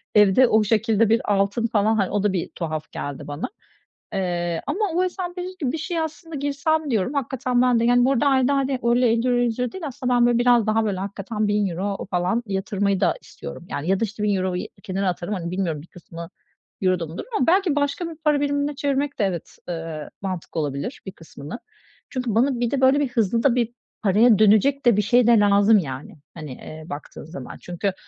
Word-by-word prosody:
evde 210 +5 +6
o 220 -1 +4
şekilde 220 +1 +2
bir 225 -2 +2
altın 200 +4 +1
falan, 220 -1 +2
hani, 195 -3 0
o 205 -1 0
da 205 -2 +2
bir 180 - -2
tuhaf 155 -3 -4
geldi 145 -1 -6
bana. 145 +1 -4 0.7
Eee, 175 -3 -1
ama 295 +8 -2 0.2
o 365 +1 +2
S&P 360 -1 -5
500 370 +1 -7
gibi 265 -5 -1
bir 320 - -3
şeye 330 +1 -2
aslında 320 +1 -6
girsem 290 +2 0
diyorum, 220 +3 0
hakikaten 255 -2 0
ben 250 -2 +3
de, 230 - +1
yani, 245 +1 +4
bu 265 - +3
arada 275 +1 +1
ayda, 270 0 +3
hani, 270 -1 0
öyle 240 +1 +3
€50 245 +2 +2
€100 245 0 0
değil, 380 - -8
aslında 255 -2 -2
ben, 240 -1 +4
böyle, 240 -1 +3
biraz 240 -2 +4
daha, 220 +1 +2
böyle, 200 -3 -1
hakikaten 205 +2 -3
€1.000 200 -1 -1
falan 180 +6 0
yatırmayı 200 0 0
da - - +2
istiyorum, 70 - -10
yani, 150 +5 -3
ya 195 0 +2
da - - 0
işte 210 0 -6
€1.000'yu 185 -3 0 0.2
kenara 190 0 -1
atarım, 180 +3 -3
hani, 170 -2 -4
bilmiyorum 175 -5 -2
bir 160 - -15
kısmı 170 -1 -10 0.5
euro'da 185 -3 +1
mı 160 +3 -9
durur - - -6
ama 255 - +1
belki 360 -2 +3
başka 290 +4 -1
bir 330 - -8
para 300 -2 +1
birimine 285 0 0
çevirmek 280 0 -1
de, - - +2
evet, 175 -4 -4
ııı, 165 -3 -5
mantıklı 185 -4 -4
olabilir 145 - -4
bir 190 - -5
kısmını. 165 - -10 0.5
Çünkü 250 -5 -2
bana 250 +2 +2
bir 240 -1 0
de, 275 - 0
böyle, 265 +2 +5
bir 285 -3 0
hızlı 230 -1 +1
da 265 -4 +4
bir, 240 -1 0 0.3
paraya 215 +2 +5
dönecek 220 +7 +4
de 235 -4 +5
bir - - +4
şey 240 +3 +3
de 235 -2 +6
lazım 205 +1 +5
yani, 135 -4 -6 0.2
hani, 155 -4 -8
eee, 155 +5 -10
baktığın 145 -1 -8
zaman. 140 -5 -9
Çünkü, 180 +2 -2
220 Hz, 210 wpm, -23 LUFS, 185-260 Hz, 0.7 s, evde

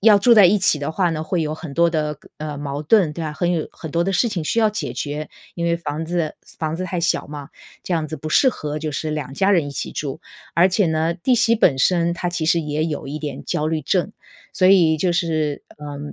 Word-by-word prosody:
要 210 -1 +6
住 240 +4 +5
在 210 -5 +8
一 205 +4 +4
起 170 -5 +3
的 140 +2 -3
话 180 -1 +1
呢， 155 -1 -3
会 165 +1 -1
有 155 0 -2
很 155 -4 -8
多 170 0 +3
的 150 -2 -1
个 - - -20
呃， 150 -1 -5
矛 145 0 -4
盾， 170 -1 +3
对 165 - -6
啊， 155 - -3
很 175 +2 0
有 160 -3 -2
很 160 - -8
多 170 +2 +1
的 195 - 0
事 235 +6 +2
情 170 -5 -2
需 230 - 0
要 215 -1 +4
解 215 - -4
决。 150 +1 -4 0.3
因 170 - -3
为 170 0 +2
房 160 -1 -4
子 170 -3 -1 0.2
房 155 -1 -2
子 185 - -3
太 180 -1 -3
小 165 0 0
嘛， 145 -1 -8 0.3
这 185 - -4
样 160 -2 0
子 155 - -5
不 155 - -6
适 260 - +4
合 150 -9 -3
就 155 0 -3
是 155 +2 -3
两 150 -3 -4
家 195 +6 +2
人 170 -7 +3
一 - - -5
起 140 - -4
住， 145 +2 -4 0.3
而 175 +3 +5
且 190 0 +2
呢 160 +1 +1
弟 215 +9 +1
媳 230 0 +3
本 150 -10 +3
身 170 +2 +2
她 175 0 -2
其 165 -2 -2
实 170 0 +3
也 150 0 -2
有 150 -3 -4
一 150 +2 -4
点 145 -4 -6
焦 150 - -1
虑 160 -1 -1
症。 185 +7 0 0.4
所 185 - +2
以 170 -5 +5
就 175 +2 +1
是， 155 -4 -1 0.2
嗯， 145 0 -7
160 Hz, 280 characters per minute, -21 LUFS, 150-180 Hz, 0.4 s, 在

